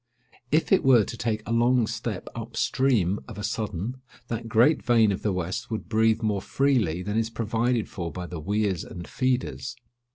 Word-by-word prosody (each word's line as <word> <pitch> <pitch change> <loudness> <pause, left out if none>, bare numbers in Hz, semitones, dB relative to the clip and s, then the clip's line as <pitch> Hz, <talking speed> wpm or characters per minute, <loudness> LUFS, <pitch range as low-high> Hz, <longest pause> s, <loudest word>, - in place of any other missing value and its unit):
If 155 +3 +2
it 195 - +5
were 125 -5 +6
to 115 - -6
take 110 -2 -2
a - - -5
long 120 +1 +3
step 110 -3 -4
up 115 0 -7
stream 110 -8 +2
of - - -9
a 105 - -5
sudden, 105 +4 -3 0.3
that 115 0 -4
great 120 +8 +4
vein 115 -3 +4
of 95 - -3
the 105 - 0
west 90 0 -3
would 110 -1 -4
breathe 110 0 +2
more 105 -3 0
freely 110 - +1
than 105 +3 0
is 115 0 -1
provided 115 +1 0
for 85 -4 -5
by 90 -1 -5
the 85 -1 -6
"weirs 100 +1 0
and 85 -1 -8
feeders." 125 0 -1
110 Hz, 190 wpm, -26 LUFS, 100-120 Hz, 0.3 s, were